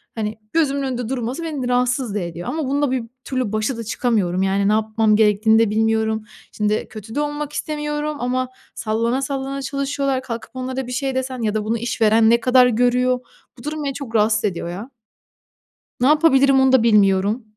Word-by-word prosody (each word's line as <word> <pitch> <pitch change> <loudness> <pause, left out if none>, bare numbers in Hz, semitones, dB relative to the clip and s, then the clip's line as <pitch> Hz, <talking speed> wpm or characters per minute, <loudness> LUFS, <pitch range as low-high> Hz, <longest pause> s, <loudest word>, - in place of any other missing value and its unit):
hani, 215 0 -3
gözümün 280 -4 +1
önünde 250 -3 -3
durması 260 +5 -3
beni 285 -6 -3
rahatsız 245 -3 0
da - - 0
ediyor 170 0 -6
ama 315 -2 -2
bununla 285 -1 0
bir 255 -3 -1 0.2
türlü 255 -5 -2
başa 215 +3 -1
da 230 - -5
çıkamıyorum. 200 -6 0
Yani, 195 +1 +1
ne - - +3
yapmam 220 0 +2
gerektiğini 220 +1 +4
de 225 -2 +3
bilmiyorum. 220 0 +1 0.3
Şimdi, 210 0 -1
kötü 220 +2 -9
de - - 0
olmak 295 0 -3
istemiyorum 295 0 -3
ama 255 +1 -1 0.3
sallana 230 +4 -1
sallana 275 0 -3
çalışıyorlar, 275 -1 -1
kalkıp 230 -3 -7
onlara 255 0 -4
bir - - -6
şey 265 +1 -2
desen 260 -1 -3
ya 215 -1 0
da 215 - 0
bunu 230 +2 0
işveren 225 -1 +3
ne 235 0 +5
kadar 250 0 +5
görüyor, 250 +1 +2 0.4
bu - - -13
durum 300 0 -4
beni 275 -1 -2
çok 250 -5 -7
rahatsız 215 0 +2
ediyor 175 -3 -2
ya. 205 +9 -7 1.1
Ne 255 - +4
yapabilirim 275 -3 +5
onu 265 0 +4
da 255 -3 +5
bilmiyorum. 205 +1 +3
245 Hz, 185 wpm, -21 LUFS, 220-270 Hz, 1.1 s, ne